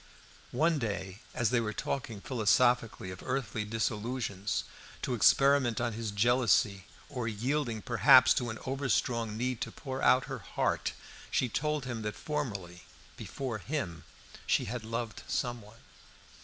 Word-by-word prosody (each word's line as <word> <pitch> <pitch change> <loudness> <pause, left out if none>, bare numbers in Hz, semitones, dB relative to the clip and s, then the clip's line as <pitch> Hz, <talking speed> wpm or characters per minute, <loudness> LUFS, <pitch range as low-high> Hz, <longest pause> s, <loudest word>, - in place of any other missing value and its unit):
One 160 +3 +3
day, 100 -4 -4 0.2
as 120 -4 +1
they 125 - +3
were 110 -2 -2
talking 115 -3 -4
philosophically 115 -4 +2
of 90 - -9
earthly 125 -5 -2
disillusions, 105 -1 -2 0.4
to 125 - -1
experiment 135 0 +4
on 120 -1 -1
his 110 0 -3
jealousy, 105 -2 +2 0.2
or 125 -5 -4
yielding, 115 +1 -1
perhaps, 120 +1 +7
to 120 -1 -1
an 110 - -5
over 135 +1 -2
strong 115 -2 0
need 125 0 -2
to - - -3
pour 135 -3 -6
out 130 0 +5
her 135 -2 -5
heart, 100 - -1 0.4
she 125 - +1
told 150 +3 -1
him 120 -3 -4
that 105 -1 -3
formerly, 100 - -4 0.3
before 125 -5 -5
him, 90 - -4 0.4
she - - +2
had 120 +1 -4
loved 115 -1 -4
someone. 115 -3 -3
115 Hz, 140 wpm, -31 LUFS, 105-130 Hz, 0.4 s, perhaps